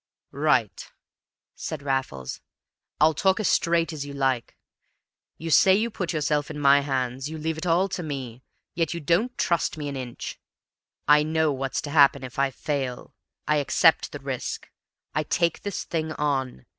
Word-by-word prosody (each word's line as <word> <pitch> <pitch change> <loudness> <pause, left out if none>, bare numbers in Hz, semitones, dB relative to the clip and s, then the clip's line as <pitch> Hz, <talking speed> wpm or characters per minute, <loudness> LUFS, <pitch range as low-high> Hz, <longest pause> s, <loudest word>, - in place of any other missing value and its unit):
"Right," - - 0 0.6
said 150 -3 -6
Raffles. 130 - -3 0.6
"I'll 155 +1 +5
talk 190 +6 +2
as 215 - +1
straight 170 0 +2
as 150 -3 -4
you 145 0 -8
like. 135 -3 -1 0.8
You 165 0 -5
say 190 +4 +6
you 225 +3 0
put 185 -4 -3
yourself 150 -2 0
in 150 -1 -6
my 140 0 +6
hands 130 -1 -2
you 160 - -6
leave 160 +1 -3
it 180 - -4
all 175 +3 +3
to 190 -1 -3
me 130 -6 -6 0.3
yet 165 -1 -1
you - - -3
don't 175 - +1
trust 170 -2 0
me 150 -1 -4
an 140 - -5
inch! 125 -3 -6 0.7
I 150 +1 +7
know 160 0 +1
what's 135 0 -3
to 145 - -5
happen 140 -2 +5
if 130 +1 -7
I 140 0 +3
fail. 135 -2 -4 0.3
I 150 0 +3
accept 145 -3 +3
the - - -5
risk. - - -5 0.4
I 155 - +1
take 170 +2 0
this 205 -2 -4
thing 160 -1 -3
on. 135 - -2
150 Hz, 170 wpm, -25 LUFS, 135-165 Hz, 0.8 s, I